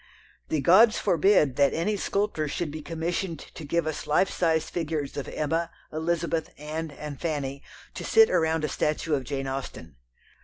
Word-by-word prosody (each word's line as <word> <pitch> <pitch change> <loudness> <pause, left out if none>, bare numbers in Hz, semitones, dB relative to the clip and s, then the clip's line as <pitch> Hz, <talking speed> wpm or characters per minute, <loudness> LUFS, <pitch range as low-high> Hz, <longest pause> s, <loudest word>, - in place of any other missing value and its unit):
The 155 - 0
gods 215 - +6
forbid 175 -7 +3
that 140 -1 +3
any 205 +6 0
sculptor 200 -5 -1
should 150 +1 -3
be 155 +1 -6
commissioned 165 +2 -3
to 155 - -11
give 165 +2 0
us 155 -1 -4
life 170 +6 +3
size 160 -2 +1
figures 155 -4 -3
of 140 - -4
Emma, 165 +2 -1 0.2
Elizabeth, 165 +1 -1
Anne, 155 +2 -4
and 145 -1 -8
Fanny 140 -4 -2 0.3
to - - -6
sit 445 0 +5
around 160 -1 +2
a - - +1
statue 150 +2 -1
of 135 -3 0
Jane 135 0 -3
Austen. 130 - -6
160 Hz, 165 wpm, -27 LUFS, 145-170 Hz, 0.3 s, gods